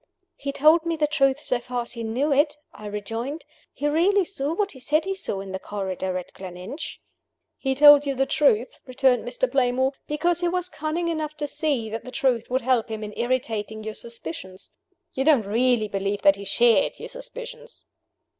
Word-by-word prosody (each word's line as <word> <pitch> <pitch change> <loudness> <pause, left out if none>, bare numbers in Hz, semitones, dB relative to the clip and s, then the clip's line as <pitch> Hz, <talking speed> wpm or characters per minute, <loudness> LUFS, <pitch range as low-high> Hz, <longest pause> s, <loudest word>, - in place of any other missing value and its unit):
"He 280 0 -4
told 310 +4 +5
me 335 -1 -1
the 305 -1 +2
truth 280 -2 +2
so 250 -4 0
far 245 0 -3
as 235 - -4
he 235 -1 -5
knew 255 +7 0
it," 290 +2 +2 0.2
I 210 - -9
rejoined. 225 +9 -4 0.3
"He 290 - -2
really 360 +6 +3
saw 310 -3 -3
what 405 +1 0
he 260 - -12
said 305 +5 +1
he 390 - -1
saw 285 - -4
in 195 -1 -8
the 190 - -4
corridor 190 -2 -3
at 180 - -8
Gleninch." 185 - -8 0.6
"He 265 -1 0
told 290 0 +8
you 275 - 0
the 270 +1 +2
truth," 265 -6 +2
returned 255 -1 +2
Mr. - - 0
Playmore, 260 0 +2 0.2
"because 340 +3 0
he 350 - +2
was 360 +1 -1
cunning 320 +1 -2
enough 310 -2 -3
to 295 -1 -2
see 280 -6 0
that 225 +1 -4
the - - -9
truth 250 -3 0
would 260 +1 +1
help 245 -2 +1
him 220 -1 -4
in 210 0 -6
irritating 225 -3 -2
your 220 0 -5
suspicions. 185 -4 -7 0.4
You 265 - 0
don't 275 -8 +4
really 235 +1 +2
believe 200 0 -2
that 195 - +6
he 200 0 -9
shared 235 +4 +3
your - - -7
suspicions?" - - -9
260 Hz, 195 wpm, -24 LUFS, 220-310 Hz, 0.6 s, told